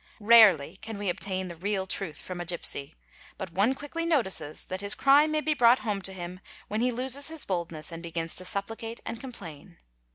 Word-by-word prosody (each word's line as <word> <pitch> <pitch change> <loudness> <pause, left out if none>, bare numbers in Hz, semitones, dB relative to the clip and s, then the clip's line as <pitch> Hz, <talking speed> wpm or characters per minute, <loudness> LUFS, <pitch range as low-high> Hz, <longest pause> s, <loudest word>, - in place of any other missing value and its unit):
bt 205 - -14
Rarely 195 -8 +7
can 220 +1 -7
we 200 -1 -2
obtain 185 +1 -2
the 170 - -7
real 190 +2 -2
truth 185 -5 -2
from 180 -1 -6
a - - -5
gipsy; 160 -4 -4 0.4
but 190 -3 -6
one 205 +9 +2
quickly 290 +4 -5
"Notices 190 - 0
that 185 +1 -5
his 200 +1 +3
crime 285 +3 +5
may 310 0 +1
be 310 0 +1
brought 245 -3 +5
home 205 -3 -1
to 195 - -4
him 180 -1 -7 0.3
when 215 +2 -2
he 250 +1 +2
loses 260 +3 0
his 320 -1 -4
Idness 170 -4 -2
and 165 0 -7
begins 165 -1 -4
to 185 - -2
supplicate 225 +4 -3
and 230 - -5
complain. 180 - -10
200 Hz, 205 wpm, -28 LUFS, 175-235 Hz, 0.4 s, Rarely